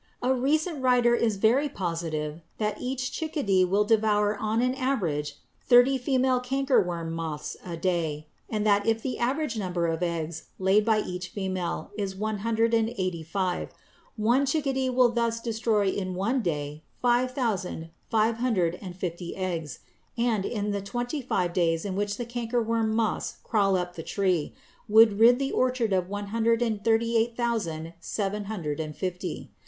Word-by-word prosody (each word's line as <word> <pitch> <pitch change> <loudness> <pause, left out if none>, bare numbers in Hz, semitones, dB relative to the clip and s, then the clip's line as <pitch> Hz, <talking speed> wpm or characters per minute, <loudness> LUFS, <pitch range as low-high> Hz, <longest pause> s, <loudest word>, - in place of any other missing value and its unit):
A 255 +1 +3
recent 300 +4 0
writer 250 -2 +4
is 230 -3 +2
very 240 +9 +3
positive 165 - -3 0.2
that 210 -1 -2
each 255 0 -2
chickadee 280 - +1
will 195 +3 +2
devour 210 -1 +2
on 215 +2 -1
an 250 +1 +2
average 175 - -1 0.3
thirty 245 +2 +6
female 260 0 +2
cankerworm 250 - 0
moths 160 -2 -4
a 170 -2 -6
day; 165 -4 -1 0.2
and 215 -1 -1
that 205 0 +3
if 225 0 +1
the 260 - -3
average 260 -1 0
number 180 -3 -1
of 165 0 -1
eggs 165 -2 -3
laid 190 +3 +3
by 220 -2 +3
each 180 -1 -5
female 185 -1 -3
is 195 -2 -2
one 215 +1 -2
hundred 230 +2 +1
and 225 -1 +3
eighty 185 -3 -2
five, 180 +2 -2 0.5
one 240 +6 +2
chickadee 270 -3 0
would 250 -1 +4
thus 230 -1 0
destroy 225 -3 +1
in 185 -1 -3
one 230 +8 0
day 150 -4 -3 0.2
five 245 +1 +3
thousand 200 -10 -2 0.2
five 225 0 +2
hundred 190 -9 0
and 180 -3 -7
fifty 175 -1 -5
eggs, 170 -7 -4 0.4
and, 230 -4 +1
in 210 -3 -2
the 200 -1 -2
twenty 245 +8 -3
five 180 -8 -1
days 165 -1 +1
in 195 -2 -3
which 205 +1 -1
the 240 - -3
cankerworm 230 -1 -1
moths 220 -1 -1
crawl 200 -4 +2
up 180 -1 -2
the 165 - -5
tree, 180 -3 0 0.3
would 215 -1 +6
rid 240 +2 +7
the 275 +1 -1
orchard 250 -5 +1
of 185 -1 0
one 205 0 -4
hundred 230 +1 +2
and 215 -3 -2
thirty 230 +1 +2
eight 230 +1 +1
thousand 170 -10 -2
seven 205 +3 -3
hundred 165 -9 -4
and 155 -1 -4
fifty. 180 -1 -4
210 Hz, 170 wpm, -27 LUFS, 180-240 Hz, 0.5 s, rid